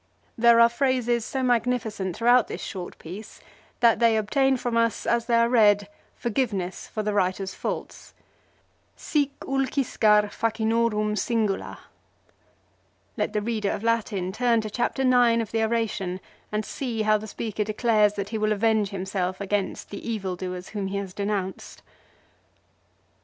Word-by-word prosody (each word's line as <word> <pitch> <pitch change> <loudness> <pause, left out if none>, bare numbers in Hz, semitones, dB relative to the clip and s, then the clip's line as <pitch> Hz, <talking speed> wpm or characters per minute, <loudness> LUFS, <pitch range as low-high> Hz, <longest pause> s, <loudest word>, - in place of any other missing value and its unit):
There 235 0 +5
are 235 - +8
phrases 240 -2 0
so 265 -1 -3
magnificent 230 -6 0
throughout 240 0 +4
this - - -6
short 185 -2 -6
piece 185 +7 -10 0.4
that 235 -2 +5
they 230 -2 +4
obtain 265 +5 +2
from 240 -1 -2
us, 230 -1 +1
as 235 0 +1
they 235 - +3
are 230 0 +4
read, 205 -4 +4 0.3
forgiveness 210 -7 -2
for 215 - -4
the 210 0 -1
writer's 190 -1 0
faults. - - -6 0.8
"Sic 290 -3 0
ulciscar 240 -6 +2
facinorum 220 -1 0
singula." 215 -2 -1 1.4
Let - - -2
the 210 -1 -1
reader 215 -3 -1
of 200 - -3
Latin 215 -5 0
turn 235 +1 +2
to 215 -1 -6
Chapter 245 +4 -1
IX 245 -2 +4
of 225 -3 -3
the 225 0 +1
oration 215 -5 -1 0.3
and 210 0 -1
see 235 -5 -3
how 215 0 +3
the 215 - -8
speaker 215 0 -3
declares 215 -1 +2
that 200 -1 -4
he 220 0 -3
will 215 0 +2
avenge 215 -1 +2
himself 185 -1 -3
against 200 0 -2
the 205 - -6
evildoers 185 -4 -4
whom 205 -3 -3
he 195 +1 -3
has 195 -2 -5
denounced. 200 -2 -4
220 Hz, 145 wpm, -25 LUFS, 200-235 Hz, 1.4 s, are